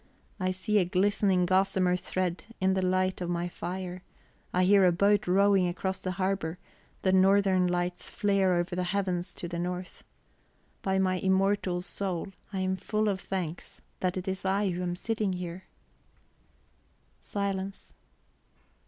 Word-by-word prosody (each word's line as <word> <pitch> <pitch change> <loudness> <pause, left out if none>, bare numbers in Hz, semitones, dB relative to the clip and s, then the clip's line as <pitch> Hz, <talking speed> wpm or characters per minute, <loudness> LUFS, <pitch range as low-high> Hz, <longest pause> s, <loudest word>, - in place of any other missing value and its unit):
I 185 -1 0
see 185 +3 +1
a - - +4
glistening 190 0 +2
gossamer 185 0 +2
thread 180 0 -2
in 190 0 +3
the 190 - +1
light 185 0 +1
of 175 - -2
my 175 0 -1
fire; 180 +1 -5 0.5
I 180 - +2
hear 195 +1 +6
a 180 - +6
boat 200 +3 +3
rowing 195 0 +4
across 190 +2 -2
the 185 -1 -3
harbour; 185 -3 -1 0.5
the 190 - +3
northern 190 -1 +4
lights 175 0 -2
flare 195 -3 +2
over 175 +1 -1
the 180 - 0
heavens 180 -1 -1
to 175 - -5
the 170 0 -4
north. 180 +1 -4 0.8
By 190 0 0
my 185 -1 +2
immortal 190 -1 +1
soul, 190 -1 -3 0.2
I 190 -2 -2
am 185 0 0
full 215 +2 -1
of 190 -1 -2
thanks 180 -4 -5 0.2
that 185 0 -1
it 185 +1 -5
is 190 0 -2
I 195 +1 +1
who 175 +1 -3
am 175 -1 -2
sitting 215 0 -1
here!" 180 0 -6 1.5
Silence. 195 -1 -4
185 Hz, 155 wpm, -29 LUFS, 180-195 Hz, 1.5 s, hear